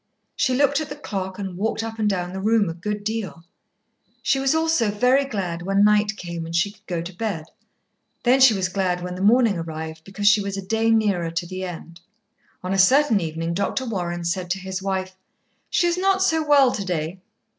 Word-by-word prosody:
She 255 - +1
looked 285 +2 +2
at 310 - -6
the 290 - -6
clock 190 -9 -5
and 190 -3 -5
walked 220 +3 -2
up 225 0 -6
and 210 -1 +2
down 180 -2 -2
the 190 - -4
room 215 -2 +2
a - - -4
good 205 +4 -4
deal. 215 -6 -4 0.8
She 270 - +2
was 270 +3 +2
also 320 -8 +2
very 250 +6 +3
glad 185 -9 -3
when 195 +3 +2
night 210 0 +3
came 170 -2 -5
and 165 +1 -6
she 175 +4 +2
could 210 +1 -25
go 170 -3 -2
to 175 +2 -8
bed. 190 -6 -3 0.8
Then 255 +2 +4
she 260 -5 +7
was 190 -2 0
glad 180 -1 -1
when 180 0 -4
the 180 - -6
morning 220 -2 +4
arrived, 160 -1 -6
because 205 +2 -3
she 210 0 +6
was 200 0 -4
a 195 - -6
day 225 +3 +1
nearer 205 -7 +2
to 165 +1 -3
the 185 +1 -6
end. 170 -1 -8 0.6
On 185 +1 -2
a 195 - +1
certain 250 +3 +5
evening 165 +1 -3
Dr. 200 +8 -1
Warren 175 -6 -3
said 175 +1 -2
to 185 - 0
his 190 0 -5
wife, 190 -1 -3 0.5
"She - - +2
is 345 +1 +1
not 385 0 +2
so 320 -4 +2
well 285 -4 +5
to 200 - -3
day. 175 -1 -3
195 Hz, 215 wpm, -23 LUFS, 180-225 Hz, 0.8 s, she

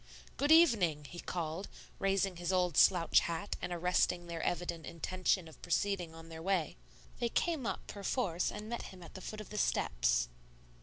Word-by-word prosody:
"Good 285 +2 +1
evening," 215 - +5
he 175 +5 -9
called, 170 +2 -3 0.3
raising 195 -2 +1
his 175 +1 -2
old 180 -3 +2
slouch 175 0 +6
hat 170 +4 -3
and 180 - -3
arresting 175 0 +1
their 170 -1 -5
evident 170 -1 -2
intention 180 +1 0
of 160 - -15
proceeding 175 -2 -1
on 165 0 -11
their 160 0 -8
way. 180 -4 0 0.4
They 235 - +1
came 310 -2 0
up, - - -3
perforce, 200 -3 -1
and 210 +1 -7
met 235 +1 -3
him 185 -2 -12
at 165 - -12
the 190 - -8
foot 215 +3 -6
of 215 - -11
the 210 - -2
steps. - - +2
180 Hz, 175 wpm, -34 LUFS, 165-200 Hz, 0.4 s, slouch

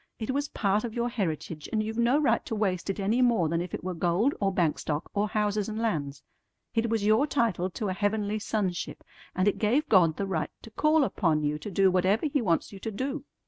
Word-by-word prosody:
It 220 +3 -3
was 285 +2 -1
part 205 -5 0
of 230 -2 -5
your 240 0 0
heritage, 165 -8 -3
and 215 -1 +1
you've 220 +2 -4
no 240 +4 +4
right 300 - +2
to 225 - -2
waste 195 -4 -1
it 195 - -2
any 215 +6 +1
more 235 -9 +3
than 165 +2 0
if 175 -1 -5
it - - -5
were 185 0 -3
gold 175 - +1
or 195 -1 +2
bank 170 -5 +1
stock 150 +1 -3
or 205 +1 +1
houses 210 0 0
and 215 - -4
lands. 150 -11 -2 0.5
It 230 0 +1
was 220 -2 0
your 220 +7 +4
title 225 - 0
to 210 +3 -4
a - - -1
heavenly 205 +1 -1
sonship, 200 -4 -3 0.3
and 185 +2 +2
it 205 - +1
gave 250 +8 +2
God 170 -6 +4
the 200 - -1
right 180 -5 -2
to 225 - -11
call 305 +5 +3
upon 165 - +1
you 150 +1 -1
to 210 - -6
do 195 0 +3
whatever 185 - +2
He 285 -2 +1
wants 170 -7 0
you 200 - -10
to 225 - -4
do. 270 +6 -4
205 Hz, 235 wpm, -28 LUFS, 180-230 Hz, 0.5 s, no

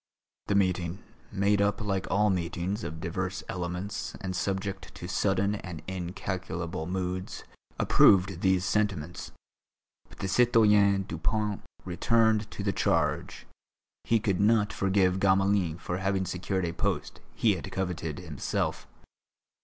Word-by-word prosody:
The 100 - +1
meeting, 95 0 0 0.3
made 100 +1 +2
up 100 +3 +1
like 100 -3 -2
all 105 +1 +3
meetings 90 +4 -2
of 80 +2 -5
divers 90 +3 -3
elements 90 +3 -4
and 95 -3 -4
subject 95 +1 -3
to 85 - -7
sudden 95 +1 +1
and 90 -6 -6
incalculable 90 -2 -4
moods, 90 0 -3 0.3
approved 95 -2 +5
these 95 -1 +2
sentiments. 95 -6 -1 0.8
But - - -15
the 100 - -3
citoyen 105 -3 +4
Dupont 100 +5 -2 0.2
returned 110 +3 +2
to 100 - -6
the 100 -1 0
charge; - - 0 0.6
he 115 - +2
could 100 -4 0
not 105 0 +3
forgive 95 -1 +2
Gamelin 95 -3 +2
for 90 +1 -4
having 95 0 0
secured 90 +1 -2
a 85 - -3
post - - -2 0.2
he - - +3
had - - -6
coveted 90 -5 -3
himself. 80 -6 -3
95 Hz, 130 wpm, -28 LUFS, 90-100 Hz, 0.8 s, approved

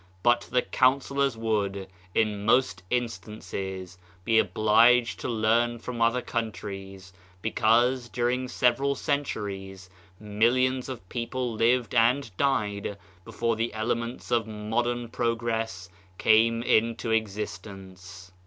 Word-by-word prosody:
But 120 0 +2
the 125 - +2
counsellors 135 0 +1
would, 100 -4 -1 0.3
in 105 -2 +1
most 105 -5 +2
instances, 95 -6 -4 0.3
be 110 -1 +4
obliged 115 +3 +4
to - - -4
learn 115 +1 +1
from 120 0 -6
other 120 +2 +2
countries, 95 -4 -5 0.3
because, 120 +3 +2
during 125 +2 -1
several 125 +3 +1
centuries, 95 -10 -4 0.3
millions 125 +5 +1
of 120 -8 -7
people 120 +2 -3
lived 115 +1 +1
and 120 -2 +2
died 105 -6 -1 0.3
before 115 +3 -1
the 115 0 -2
elements 115 +2 -3
of 115 -2 +2
modern 115 +3 -2
prog 115 0 -2
ress 110 -5 -2 0.3
came 115 +2 +3
into 115 0 +1
existence. 95 -4 -5
115 Hz, 110 wpm, -27 LUFS, 105-120 Hz, 0.3 s, be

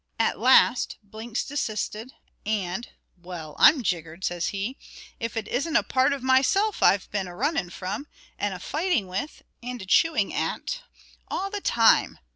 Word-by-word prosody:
At 225 - +1
last 250 +1 +4
Blinks 220 +3 -5
desisted, 220 -3 -3 0.3
and 210 +2 -2 0.3
"Well, 170 -4 -8
I'm 280 -4 +7
jiggered," 170 -2 -3
says 175 -2 -1
he, 200 +6 -3 0.4
"if 230 -3 -4
it 220 -2 -3
isn't 305 +6 -1
a - - +5
part 260 +2 +2
of 280 -2 -3
myself 270 +12 +3
I've 195 - +4
been 195 -2 -2
a 175 - -9
running 275 - 0
from, 200 +10 -5 0.3
and 205 - 0
a - - -8
fighting 310 - 0
with, 190 +11 -5 0.2
and 245 0 -6
a 190 - -7
chewing 210 - +3
at, - - -2 0.5
all 390 +1 -3
the 410 -1 -4
time. 230 -9 +4
225 Hz, 160 wpm, -26 LUFS, 190-275 Hz, 0.5 s, I'm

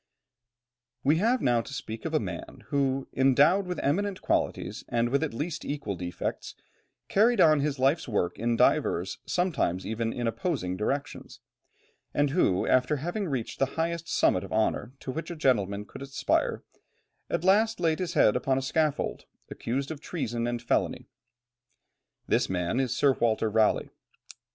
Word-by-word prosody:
] 125 0 -60
We 150 +3 +4
have 230 +7 +2
now 120 -2 +3
to 140 - -10
speak 110 -4 -6
of - - -3
a - - +4
man - - -7
who, 135 -1 0
endowed 140 +9 +4
with 180 -1 -3
eminent 190 +7 0
qualities - - -1
and 120 0 +1
with 140 +4 +1
at 160 - -1
least 155 +7 -4
equal 140 -9 -3
defects, 90 -1 -5 0.5
carried 230 +4 +3
on 155 -2 +6
his 140 0 -1
life's 135 +5 +2
work 90 -6 -1
in 120 0 +1
divers, 90 -3 +2
sometimes 155 - 0
even 115 +1 -2
in 120 - -3
opposing 115 - -2
directions, 140 +9 -3 0.8
and 145 -1 +2
who 100 - +2
after 130 +3 +3
having 175 +8 -3
reached 130 -7 -3
the 135 - +3
highest 165 0 -2
summit 90 - +2
of 95 - -9
honour 110 +3 0
to 130 - -4
which 160 +4 -5
a 175 - -5
gentleman 105 - +1
could - - -11
aspire, 140 0 0 0.7
at - - -1
last 215 +4 +3
laid 165 -2 +1
his 180 -2 -3
head 105 - +5
upon 130 +1 +1
a 135 - -1
scaffold, 150 +2 -1 0.3
accused 135 +5 -3
of 150 -3 -7
treason 120 -8 -3
and 120 -1 -3
felony. 115 - -1 1.2
This - - +1
man 90 +5 -1
is 130 -3 0
Sir 140 -2 +4
Walter 110 -3 +1
Raleigh. 110 0 +2
135 Hz, 165 wpm, -28 LUFS, 115-160 Hz, 1.2 s, on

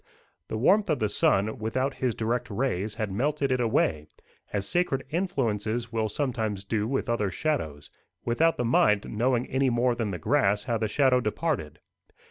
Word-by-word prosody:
The 110 - -3
warmth 195 - +3
of 155 - +2
the 110 -3 0
sun, 105 +2 +1
without 130 +5 -1
his 125 -4 -1
direct 115 +2 -1
rays, 105 -3 -2
had 110 -3 -3
melted 140 +6 0
it 130 - +1
away, 80 -10 +1 0.4
as 100 -1 -2
sacred 175 - 0
influences 120 - -1
will 110 -1 0
sometimes 110 -6 -2
do 105 +1 -1
with 135 +2 -1
other 110 -4 0
shadows, 80 - -3 0.3
without 160 +8 +2
the 125 - -1
mind 105 -3 +3
knowing 120 +2 +1
any 130 0 +1
more 120 +1 +2
than 115 -3 -2
the 95 - -3
grass 105 - +2
how 120 -3 -1
the 110 - 0
shadow 130 +3 +3
departed. 110 - -2
115 Hz, 170 wpm, -27 LUFS, 105-135 Hz, 0.4 s, warmth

